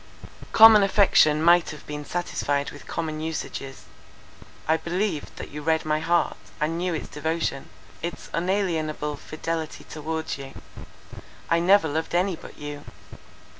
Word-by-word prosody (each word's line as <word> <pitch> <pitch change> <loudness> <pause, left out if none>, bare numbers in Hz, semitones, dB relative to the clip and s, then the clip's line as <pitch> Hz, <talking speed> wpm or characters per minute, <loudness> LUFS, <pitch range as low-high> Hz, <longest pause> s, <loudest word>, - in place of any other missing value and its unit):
"Common 220 -1 +9
affection 190 -6 +4
might 175 0 +5
have 150 - -9
been 150 0 -6
satisfied 145 -5 -2
with 145 - -13
common 155 -2 -3
usages. 150 -4 -5 0.8
I 160 - +4
believed 175 -1 -2
that - - -8
you 150 +1 -6
read 160 +1 +1
my 155 0 +1
heart, 170 +2 +1 0.2
and 155 +1 0
knew 180 -1 -1
its 155 - -5
devotion, 160 -2 -3 0.3
its 170 0 -5
unalienable 165 -5 -1
fidelity 160 +2 -5
towards 160 -1 -4
you. 135 0 -9 1.0
I 170 - +4
never 185 0 +5
loved 160 +3 -2
any 180 +1 +2
but - - -13
you. 145 0 -7
160 Hz, 135 wpm, -25 LUFS, 150-175 Hz, 1.0 s, Common